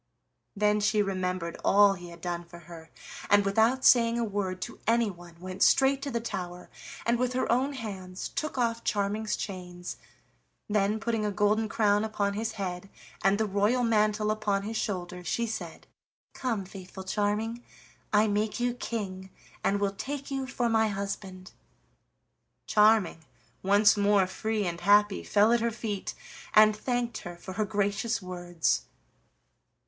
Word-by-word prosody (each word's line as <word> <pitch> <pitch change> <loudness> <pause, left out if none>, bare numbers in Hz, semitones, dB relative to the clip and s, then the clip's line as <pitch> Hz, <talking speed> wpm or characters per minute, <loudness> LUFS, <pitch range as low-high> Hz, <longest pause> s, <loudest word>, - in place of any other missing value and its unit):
Then 210 +1 +2
she 210 0 +2
remembered 185 -3 -3
all 200 0 +6
he 175 -2 -9
had 170 0 -12
done 175 0 -3
for 170 0 -13
her, 165 -1 -12 0.4
and 205 0 +5
without 225 +6 +2
saying 235 -1 +6
a 235 - 0
word 200 -4 -2
to - - -8
anyone 185 -7 -1
went 185 +2 -7
straight 270 0 +4
to 280 - -3
the 235 -3 -1
tower, 180 -6 -6 0.3
and 235 +1 +2
with 250 0 0
her 255 - 0
own 260 +4 +1
hands 190 -7 -6
took 305 -3 -4
off 230 -2 0
Charming's 210 +1 -1
chains. 180 -3 -6 0.7
Then, 210 +1 +1
putting 225 -1 -1
a 210 - 0
golden 210 +2 +1
crown 210 -1 +2
upon 205 -2 -1
his 220 +2 -3
head, 190 -2 -5 0.3
and 195 +1 +4
the 220 - +1
royal 205 +5 +1
mantle 215 -2 +2
upon 205 -2 0
his 220 +2 -5
shoulders, 180 -4 -3
she 235 - 0
said: 185 -7 -6 0.5
"Come, 230 -7 -2
faithful 190 0 -10
Charming, 210 +4 -1 0.5
I 210 +1 +4
make 210 +2 -1
you 245 0 +1
king, 195 -6 -5 0.3
and 200 +1 +1
will 200 -1 0
take 275 +6 -5
you 270 -1 -2
for 245 -2 -1
my 220 -1 +3
husband." 195 -2 -5 1.1
Charming, 210 -6 +3 0.4
once 205 +2 +5
more 205 -1 +3
free 215 +2 -2
and 170 -1 -3
happy, 205 +1 +4
fell 210 +3 +4
at 240 - +3
her 235 +1 +1
feet 215 -3 -4 0.4
and 215 0 +7
thanked 245 +1 -2
her 175 0 -8
for 190 +2 -8
her 215 +2 0
gracious 205 +2 -1
words. 175 -3 -1
205 Hz, 155 wpm, -28 LUFS, 190-225 Hz, 1.1 s, and